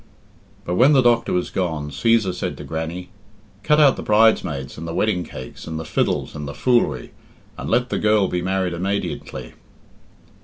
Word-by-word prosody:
But 90 +1 -2
when 135 +5 +6
the 135 -2 +5
doctor 120 -1 +3
was 90 - -1
gone, 80 -6 -2
Cæsar 110 +5 +2
said - - -4
to - - -8
Grannie, 80 +3 -5 0.5
"Cut 150 0 +3
out 145 -3 +5
the - - -4
bridesmaids 100 - +2
and 80 +1 -7
the 85 - -5
wedding 105 -5 +1
cakes 65 -6 -10
and 80 -1 -4
the 80 - -6
fiddles - - -1
and 75 -1 -6
the 70 - -7
foolery, 95 - +1 0.4
and - - -6
let 125 0 +1
the - - -1
girl 105 -2 +3
be 90 -1 -2
married 95 -1 -1
immadiently." 85 -8 -4
90 Hz, 180 wpm, -21 LUFS, 80-110 Hz, 0.5 s, when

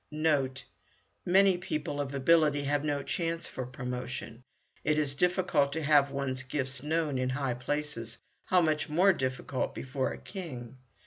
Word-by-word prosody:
Note. 150 -4 0 0.6
Many 190 0 +5
people 150 -4 -3
of 140 0 -4
ability 145 +1 +4
have 145 +1 0
no 145 -2 -1
chance 165 +1 -1
for 130 -2 -5
promotion. 125 -1 -5 0.4
It 150 0 +2
is 145 -3 +2
difficult 175 -3 +2
to 160 +1 -2
have 145 -1 +5
one's 135 -1 -2
gifts 130 -1 -3
known 150 -2 0
in 130 0 0
high 135 -1 -1
places; 125 -2 -3 0.3
how 180 -1 +4
much 155 -2 +1
more 185 +6 +5
difficult 130 -2 -2
before 130 0 -2
a - - -6
king? 130 - -8
145 Hz, 150 wpm, -30 LUFS, 130-155 Hz, 0.6 s, Many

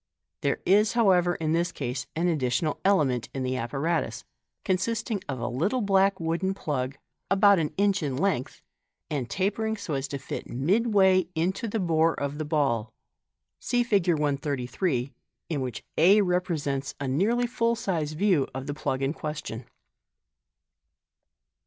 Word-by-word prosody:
There 140 - +1
is, 210 +3 +4
however, 185 -7 +3
in 155 -1 -2
this 170 +1 +1
case 130 -5 -4
an 170 +3 +1
additional 145 -1 0
element 135 - +2
in 135 - -2
the 130 0 -1
apparatus, 140 +7 -2 0.4
consist 210 +5 -1
ing 205 - -1
of 130 -2 -3
a 120 - -2
little 170 - 0
black 195 -1 +3
wooden 170 +4 -1
plug, 135 -6 -3 0.3
about 200 -1 +5
an 155 -2 -1
inch 200 -1 +2
in 140 -4 -2
length, 180 -7 -1 0.5
and 135 -6 -2
tapering 220 - -1
so 190 -6 -5
as 135 0 -1
to 140 - -4
fit 135 - -6
midway 190 - +3
in 165 +3 +2
the 220 +2 -3
bore 165 -2 +2
of 140 +1 -3
the 155 - -2
ball. 135 -8 0 0.7
(See 245 -1 +1
Fig. 200 -6 +1
133, 140 -2 -1 0.4
in 150 -5 -1
which 125 -3 -4 0.2
a 195 +6 +6
represents 165 -7 -1
a 140 - -3
nearly 210 - +2
full 235 -1 0
sized 165 -10 -2
view 185 -7 +3
of 130 0 -4
the 145 - -3
plug 135 -2 -2
in 135 +2 0
question.) 150 -7 -5
165 Hz, 150 wpm, -27 LUFS, 135-195 Hz, 0.7 s, a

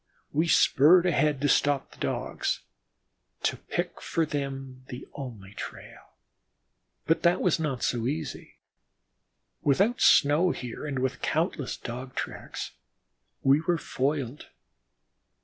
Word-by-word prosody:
We 160 +4 +2
spurred 170 +3 +6
ahead 150 -4 +2
to 145 - +2
stop 145 -1 +2
the - - -17
Dogs, - - -2 0.8
to - - +1
pick - - -4
for 165 - 0
them 135 -3 -5
the 125 0 -8
only 110 -8 -8
trail. - - -9 0.9
But 160 0 +2
that 175 +1 +3
was 175 -3 +2
not 140 -6 -2
so 120 -1 0
easy. 150 0 -4 1.1
Without 195 - +2
snow 150 +6 +5
here 125 -1 -5
and 140 -2 -3
with 130 +1 -1
countless 155 -3 -1
Dog 125 +2 -7
tracks, - - -5 0.7
we 140 +3 +5
were 170 +1 +1
foiled. 140 -2 -2
145 Hz, 120 wpm, -28 LUFS, 130-160 Hz, 1.1 s, spurred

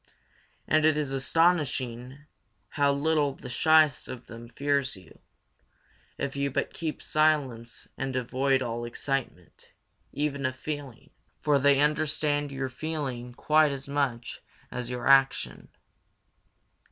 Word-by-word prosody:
And 155 0 +3
it 155 -1 +4
is 145 -3 -1
astonishing 135 -4 +1 0.5
how 145 -1 +2
little 145 -1 +1
the 125 - -9
shyest 155 0 +4
of 125 -1 -8
them 115 +1 -11
fears 140 -1 -1
you, 90 -4 -17 1.0
if 140 - -3
you 140 0 0
but 135 - -2
keep 160 -2 -4
silence 140 -7 +1
and 135 -1 -3
avoid 130 +2 +1
all 120 -1 -3
excitement, 120 -7 -4 0.4
even 140 -2 -1
of 130 - -5
feeling; 145 -4 -7 0.3
for 145 -2 +3
they 140 0 +4
understand 150 -1 +1
your 135 -1 -3
feeling 130 -4 -5
quite 155 +1 +3
as 135 0 -6
much 140 -5 -2 0.3
as 125 -1 -4
your 125 -1 -4
action. 135 -1 +3
140 Hz, 125 wpm, -28 LUFS, 125-150 Hz, 1.0 s, it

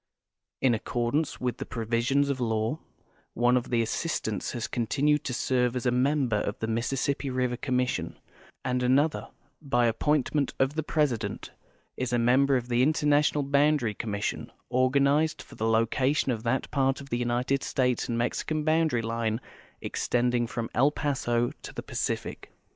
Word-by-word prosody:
In 130 -2 +4
accordance 120 +7 -1
with 125 -1 -2
the - - -5
provisions 120 +5 0
of 135 - -3
law, 115 +4 -1 0.6
one 120 +2 +3
of 125 - -1
the 115 -2 +2
assistants 110 - -2
has 120 -2 -3
con 120 -2 -2
tinued 150 +5 +2
to - - -2
serve 125 0 +1
as 125 - -3
a 125 - +3
member 130 -2 +2
of 105 0 -2
the - - -3
Mississippi 135 +5 -1
River 125 -1 0
Commission, 125 0 -1 0.5
and 125 0 0
another, 140 +5 +2 0.3
by 120 -5 +2
appointment 140 +4 +1
of 135 +1 +1
the 160 - -1
President, 150 -7 -1 0.5
is 130 -2 -2
a 120 - +2
member 130 +3 +4
of 120 -1 -4
the 120 0 +2
Interna 150 0 +3
tional 145 -2 0
Boundary 145 -5 +3
Commission, 105 -1 -3 0.2
organized 140 +5 +2
for - - -16
the 110 - -2
location 130 +5 +2
of 115 -3 -2
that 120 +3 -1
part 135 -1 +1
of 140 0 -11
the 120 - 0
United 125 +3 0
States 125 -2 0
and 115 - -1
IMexican 150 +5 -1
boundary 155 -7 +2
line 115 -1 -1 0.4
extending 120 -1 0
from 115 0 -3
El 135 +5 +4
Paso 130 -5 0
to - - -8
the - - -7
Pacific. - - -4
125 Hz, 165 wpm, -27 LUFS, 120-140 Hz, 0.6 s, In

